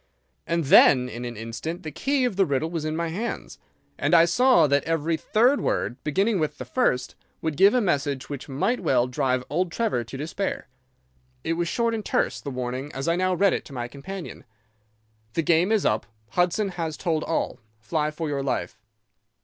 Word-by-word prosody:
And 170 0 0
then 130 -2 +6
in 120 +1 -6
an 120 -2 -6
instant 115 +10 -5
the 155 - -5
key 275 - 0
of 240 -6 -1
the 195 - +4
riddle 145 +3 -1
was 165 -3 -3
in 155 0 -2
my 170 0 -1
hands, 185 - -5 0.4
and 145 +4 +3
I 165 0 +7
saw 245 0 +5
that 140 0 +2
every 165 0 0
third 245 - +2
word, 125 +2 -2
beginning 195 +7 +1
with 155 -1 -1
the - - -6
first, 130 - 0 0.3
would 160 -2 -1
give 195 - +5
a 250 - +3
message 145 - -1
which 140 0 -7
might 190 - 0
well 130 -8 +2
drive 130 0 0
old 175 +3 -1
Trevor 210 - 0
to 135 - -8
despair. 150 +4 -3 0.8
"It - - 0
was 170 +1 -1
short 235 +5 0
and 220 -2 -3
terse, - - 0
the 140 - -5
warning, 130 +2 -4
as 135 +4 -4
I 170 - +3
now 185 0 +1
read 195 +1 +3
it - - -2
to 140 - -12
my 120 -2 -3
companion: 155 +9 -8 0.9
"'The 165 - 0
game 170 +5 +3
is 220 -3 +2
up. 105 0 +1 0.2
Hudson 180 - +1
has 165 -4 -4
told 160 -4 -1
all. 165 - -2 0.2
Fly 150 +6 -1
for 155 +1 -4
your 140 -2 -1
life. 115 -5 -3
160 Hz, 200 wpm, -25 LUFS, 135-185 Hz, 0.9 s, I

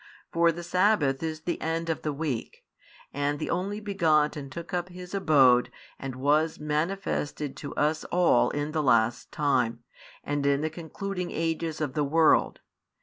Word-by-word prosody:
For 170 0 +4
the 175 +1 -7
sabbath 175 -7 +2
is 160 -1 -4
the 170 +1 -3
end 165 +1 -2
of 165 - -2
the 150 - -2
week, 140 -5 -4 0.5
and 145 +1 -1
the 155 - -3
Only 195 +4 -2
Begotten 155 -8 +1
took 170 +3 -8
up 180 0 -1
His 180 0 -10
abode 135 -10 +4 0.3
and 135 -2 -5
was 150 +4 +1
manifested 150 -2 -2
to 140 - -7
us 155 +1 +1
all 175 -8 +3
in 145 +1 -3
the 155 0 0
last 120 -3 +2
time, 125 -5 0 0.4
and 145 0 -2
in 140 0 +2
the 155 0 -1
concluding 180 +3 -5
ages 165 -1 -2
of 150 -4 -2
the 150 - 0
world. 160 +3 +3
155 Hz, 160 wpm, -27 LUFS, 145-170 Hz, 0.5 s, For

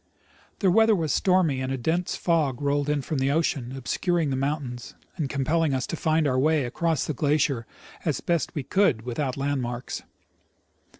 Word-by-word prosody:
The 190 -3 +4
weather 220 +2 +5
was 160 -5 0
stormy, 180 -8 +2
and 130 0 -2
a 135 - -1
dense 165 +8 -1
fog 155 -7 +1
rolled 145 0 0
in 145 -2 0
from 150 +1 -2
the 135 +1 +1
ocean, 140 -5 0
obscuring 165 +4 0
the - - 0
mountains, 135 -3 -3 0.2
and 155 -6 -2
compelling 150 +2 +1
us 130 - -1
to - - -4
find 160 0 +1
our 130 -2 +2
way 155 0 +2
across 160 +4 0
the 155 - -2
glacier 140 -4 +1 0.4
as - - 0
best 170 +1 -1
we 145 - -2
could 145 - +2
without 125 +2 -2
land 140 0 0
marks. 120 +1 -4
145 Hz, 180 wpm, -26 LUFS, 130-165 Hz, 0.4 s, weather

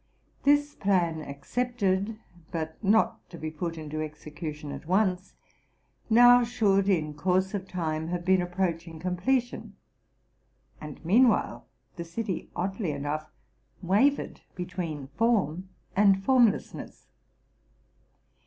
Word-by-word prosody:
This 290 +1 +3
plan 175 - +1
accepted, 200 - -2 0.3
but 160 -1 -4
not 210 +3 +2
to 175 - -10
be 155 -1 -5
put 165 +1 -4
into 155 0 -5
execution 150 -1 -7
at 140 +2 -8
once, 185 0 +1 0.7
now, 245 +2 +7
should 205 -5 +2
in 155 -5 +1
course 185 +5 0
of 195 -2 -4
time 160 -3 -3
have 175 0 -3
been 190 -1 +4
approaching 175 -2 -2
com 180 +1 -2
pletion; 245 +6 -1 1.1
and, 150 +1 -9
meanwhile, 230 +7 +3 0.3
the 170 - -4
city 190 +3 -4
oddly 190 +1 -2
enough 145 +1 -3 0.5
wavered 225 +11 +2
be 180 - -4
tween 165 -7 -5
form 190 -6 +1 0.3
and 195 -1 +4
formlessness. 245 -5 +1
185 Hz, 115 wpm, -28 LUFS, 160-210 Hz, 1.1 s, now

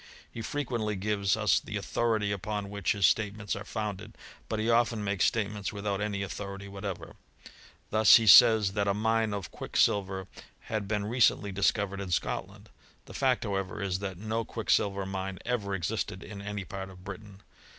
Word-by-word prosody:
He 115 - -6
frequently 115 -5 -2
gives 100 -1 0
us - - +3
the - - -5
authority 110 -3 0
upon 100 0 -3
which 100 -1 0
his 100 -2 +2
statements 105 +2 +1
are 100 - -6
founded; 110 0 -5 0.3
but 110 - -1
he 110 +1 -1
often 115 -2 +2
makes. 100 -2 +1
statements 105 -2 -1
without 100 -1 -3
any 105 -2 -2
authority^" 100 0 -6
whatever. 100 -1 -7 0.7
Thus 110 -1 +7
he 115 - +5
says, 110 -2 +8
that 100 -1 0
a 100 - +2
mine 110 +1 +1
of 100 -4 -5
quicksilver" 95 -2 0 0.3
had 105 -2 -4
been 105 -1 -1
recently 110 -3 +2
discovered 100 0 0
in 95 - -5
Scotland: 85 - -3 0.3
the - - -12
fact;^ 130 -2 +1
however, 95 0 -3
is, 95 -2 -1
that 95 -2 -5
no 110 +3 -2
quicksilver 100 -3 0
mine 95 0 -4
ever 105 -5 -1
existed 95 +1 -3
ic* - - -11
any 100 -1 -5
part 95 +1 -6
of 90 -1 -14
Britain. 100 0 -10
100 Hz, 170 wpm, -29 LUFS, 100-110 Hz, 0.7 s, says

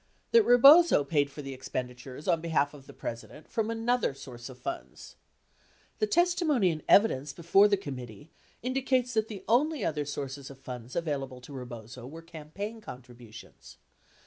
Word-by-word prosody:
That 465 - +7
Rebozo 275 - +7
paid 145 -1 +1
for 145 +1 -9
the 135 0 -6
expenditures 130 +1 -6
on 165 - +2
behalf 155 -4 0
of 140 -2 -14
the - - -10
President 120 +6 -8
from 225 -1 -2
another 230 - 0
source 120 -2 -10
of 130 - -11
funds. 340 - -7 0.8
The 430 - +2
testimony 335 - +2
and 155 -1 -5
evidence 145 -10 +4
before 185 +7 +4
the 205 -1 +2
committee 125 - -8 0.3
indicates 255 -1 0
that 220 -1 +1
the 210 -4 -8
only 290 +7 +2
other 150 -2 -1
sources 140 -1 -6
of 140 - -11
funds 125 -2 -9
available 140 -6 -3
to 135 +3 -12
Rebozo 120 -1 -8
were 165 +4 -10
campaign 170 +7 -7
contributions. 120 - -12
150 Hz, 155 wpm, -29 LUFS, -, 0.8 s, That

